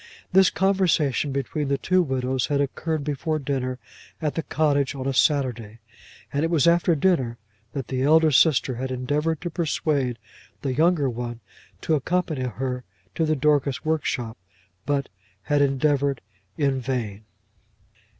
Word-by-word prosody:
This 190 0 +6
conversation 175 -8 +1
between 140 +2 -2
the 140 0 +1
two 185 +4 +2
widows 130 -4 -1
had 145 -1 0
occurred 150 +2 -1
before 150 +2 -1
dinner 130 -3 -2 0.4
at 150 -3 -1
the 165 - -1
cottage 145 -3 +1
on 130 -1 -5
a 135 - 0
Saturday; 125 -7 +1 0.6
and 145 +2 0
it 165 - +1
was 165 -3 +3
after 170 0 +4
dinner 135 -8 +1 0.4
that 135 -4 -4
the 130 -1 -1
elder 155 +3 +5
sister 135 -3 +3
had 130 +1 -3
endeavoured 145 +5 -1
to 175 -1 -4
persuade 150 -6 0 0.5
the 135 -2 -1
younger 160 0 +3
one 120 -1 -4 0.4
to 160 - 0
accompany 155 -2 0
her 125 +1 -3 0.3
to 160 - 0
the 155 - +2
Dorcas 145 0 +1
workshop; 125 -8 -1 0.5
but 140 -2 0 0.3
had 145 +4 +1
endeavoured 140 0 +1 0.4
in 140 -3 +1
vain. 115 -5 -3
140 Hz, 145 wpm, -24 LUFS, 130-155 Hz, 0.6 s, This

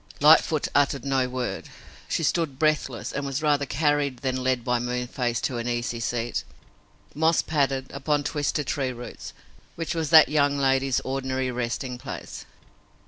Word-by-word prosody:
Lightfoot 155 0 +5
uttered 140 -2 +2
no 135 -2 +1
word. 125 -1 -4 0.4
She 165 - -1
stood 155 -3 0
breathless, 150 -5 0
and 140 - -3
was 140 +2 -3
rather 145 -2 +2
carried 145 -2 +1
than 130 -1 -1
led 130 -2 +1
by 125 -1 +1
Moonface 125 0 -2
to 120 -3 -2
an 115 - -4
easy 120 -1 -2
seat, 115 0 -2 0.7
moss 160 +2 +2
padded, 135 -3 0
upon 145 +1 -1
twisted 145 0 -1
tree 130 -1 -1
roots, 120 0 -9 0.4
which 165 -1 -3
was 160 -3 -2
that 160 -2 +8
young 145 -1 +2
lady's 135 -1 +2
ordinary 130 -1 -2
resting 125 +1 -3
place. 135 +1 -8
135 Hz, 150 wpm, -25 LUFS, 125-145 Hz, 0.7 s, that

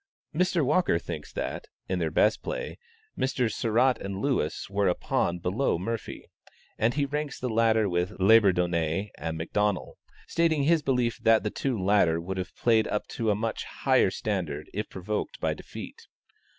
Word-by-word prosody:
Mr. 175 -2 +2
Walker 155 - +3
thinks - - -6
that, - - -4 0.2
in 90 -1 -1
their 80 -2 0
best 105 +7 +2
play, - - -5 0.4
Messrs. 125 -4 0
Sarratt 125 +3 +2
and 100 -1 -4
Lewis 130 - -1
were 100 0 +1
a 90 - +2
pawn 85 - 0
below 90 +6 0
Morphy, 115 +6 -5 0.5
and 115 +3 +2
he 145 -1 +1
ranks 150 +1 -3
the 125 - -2
latter 110 -1 +3
with 90 +3 -2
Labourdonnais 95 -3 +3
and 80 +1 -4
McDonnel, 105 +4 -1 0.3
stating 165 -3 +2
his 165 +2 +3
belief 125 -4 0
that 115 -1 +4
the 105 - -1
two 130 -4 -2
latter 95 -4 +3
would 95 +3 -5
have 90 - -5
played 110 -2 +3
up 105 - -2
to 115 -2 -1
a 105 - +3
much 110 +2 -2
higher - - +2
standard 85 -8 -3
if 105 +2 -3
provoked 100 +3 -4
by - - 0
defeat. - - -10
105 Hz, 165 wpm, -27 LUFS, 90-125 Hz, 0.5 s, that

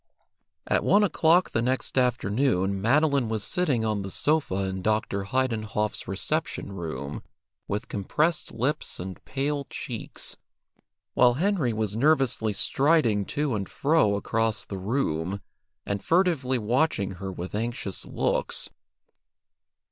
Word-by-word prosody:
At - - +1
one 205 +1 +5
o'clock 175 -1 +3
the 115 - +1
next 125 +2 -1
afternoon 105 -5 +1
Madeline 140 +1 +3
was 110 -2 -1
sitting 140 -11 +1
on 105 -2 0
the 95 - -5
sofa 140 - +1
in 95 -1 -3
Dr. 105 -1 0
Heidenhoff's 110 -3 -1
reception 100 - -2
room 80 -6 -5 0.5
with 105 +1 -3
compressed 150 - 0
lips 125 +6 -1
and 95 +1 -7
pale 140 +1 -2
cheeks, - - -5 0.8
while 120 -1 +5
Henry 170 - +1
was 110 -2 -2
nervously 135 -4 +2
striding 120 -3 +2
to 145 +2 -1
and 100 -3 -3
fro 140 -9 +2
across 110 +1 0
the 95 - -6
room, 95 - -1 0.5
and 100 -1 -3
furtively 165 -8 +2
watching 115 -3 +1
her 95 -1 -3
with 90 0 -6
anxious 110 -3 -3
looks. - - -1
115 Hz, 125 wpm, -26 LUFS, 100-140 Hz, 0.8 s, one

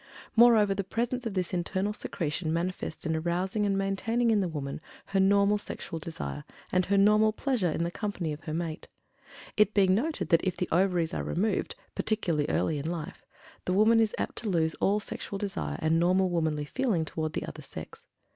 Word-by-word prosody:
Moreover, 225 -4 +6
the 195 0 -2
presence 235 +5 -2
of 205 - -5
this 185 0 -1
internal 190 +3 -1
secretion 160 -4 -3
manifests 170 0 -3
in 160 0 0
arousing 180 +6 0
and 195 -1 +1
maintaining 225 +5 +1
in 215 - +3
the 185 - 0
woman 140 -3 -4 0.3
her 195 - 0
normal 200 +2 +4
sexual 165 -4 -6
desire, 160 -2 -6 0.3
and 185 0 +2
her 200 +1 +2
normal 210 +2 +5
pleasure 225 -5 0
in 165 - -1
the 170 - -2
company 185 -6 -3
of 150 - -10
her 155 - -4
mate; 165 -2 -4 0.7
it 210 0 +4
being 190 -2 +5
noted 260 - -1
that 165 -2 +4
if 185 - -1
the 180 - -1
ovaries 175 -2 +2
are - - -2
removed, 210 - -1 0.2
particularly 170 -9 +1
in - - +1
early 150 -3 0
life, 160 0 -5 0.4
the 185 - 0
woman 220 +4 +5
is 220 -2 +2
apt - - -3
to 220 - -2
lose 160 -3 +1
all 205 +2 +3
sexual 200 -1 -4
desire 195 -1 -3
and 160 +1 +3
normal 185 +2 +3
womanly 160 -3 0
feeling 210 - 0
toward 155 0 -3
the - - -2
other - - -8
sex. - - -9
185 Hz, 195 wpm, -29 LUFS, 165-210 Hz, 0.7 s, Moreover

